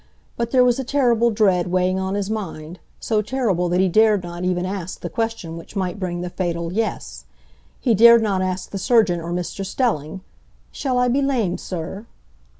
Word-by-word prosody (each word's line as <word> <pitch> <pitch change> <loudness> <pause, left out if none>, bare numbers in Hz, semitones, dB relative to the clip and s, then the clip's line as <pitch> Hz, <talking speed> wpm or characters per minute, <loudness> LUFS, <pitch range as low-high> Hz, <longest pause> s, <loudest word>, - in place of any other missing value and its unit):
But 235 -1 -2
there 255 0 +4
was 245 0 +2
a - - -1
terrible 240 -3 +2
dread 195 -6 +2
weighing 185 +1 +1
on 190 +1 -2
his 200 -1 -2
mind, 180 -6 -5 0.2
so 215 -2 0
terrible 210 -7 0
that 180 +1 +1
he 190 - +4
dared 210 +1 +3
not 175 0 -6
even 180 0 0
ask 185 -2 -5
the 175 - -5
question 225 -7 -3
which 165 - -12
might 190 0 -2
bring 175 -2 -3
the 180 - -4
fatal 170 -2 -3
"yes"; 65 - -3 0.5
he 240 - +2
dared 235 +2 +7
not 195 -3 0
ask 185 0 -3
the 195 - -4
surgeon 195 -4 +3
or 170 +1 -6
Mr 180 +2 -3
Stelling, 190 - -2 0.5
"Shall 260 -3 -2
I 250 0 +3
be 260 +3 +1
lame, 240 -10 0
Sir?" 185 +5 -6
190 Hz, 190 wpm, -21 LUFS, 175-225 Hz, 0.5 s, dared